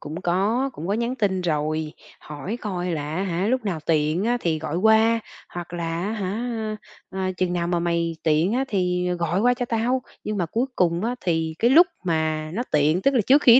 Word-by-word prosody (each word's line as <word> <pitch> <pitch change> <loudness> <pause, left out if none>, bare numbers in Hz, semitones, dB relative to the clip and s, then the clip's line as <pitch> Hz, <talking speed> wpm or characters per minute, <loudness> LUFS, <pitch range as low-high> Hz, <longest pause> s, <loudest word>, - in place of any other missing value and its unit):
Cũng 155 +4 -6
có, 210 +10 +1
cũng 165 -4 -7
có 200 - +1
nhắn 235 +3 -1
tin 200 -6 0
rồi, 155 -2 -1 0.3
hỏi 155 +10 -6
coi 180 -4 -3
là, 150 -1 -3
á 185 - 0
hả, 185 0 -1
lúc 255 +1 0
nào 180 -6 -2
tiện 155 +4 +1
á 240 +1 +2
thì 165 -5 0
gọi 155 0 -3
qua, 220 +3 +4 0.3
hoặc 175 -1 -7
là 170 -1 -3
á 210 - -2
hả, 220 +2 -3 0.3
à, 190 0 -2
"Chừng 185 -1 0
nào 175 -1 0
mà 175 0 +1
mày 170 -1 0
tiện 160 +5 +2
á, 260 +3 +1
thì 180 -4 0
gọi 170 +3 0
qua 245 +3 +4
cho 245 -1 -3
tao." 240 +3 0 0.2
Nhưng 215 -1 -2
mà 175 - 0
cuối 230 +10 0
cùng 175 +2 +2
á, 240 - 0
thì 160 -2 0
cái 235 - +3
lúc 340 +7 +8 0.2
mà 155 -2 0
nó 240 - 0
tiện, 155 +4 +3
tức 275 - +3
là 245 - +4
trước 280 +3 +6
khi 235 - +8
180 Hz, 220 wpm, -24 LUFS, 165-225 Hz, 0.3 s, lúc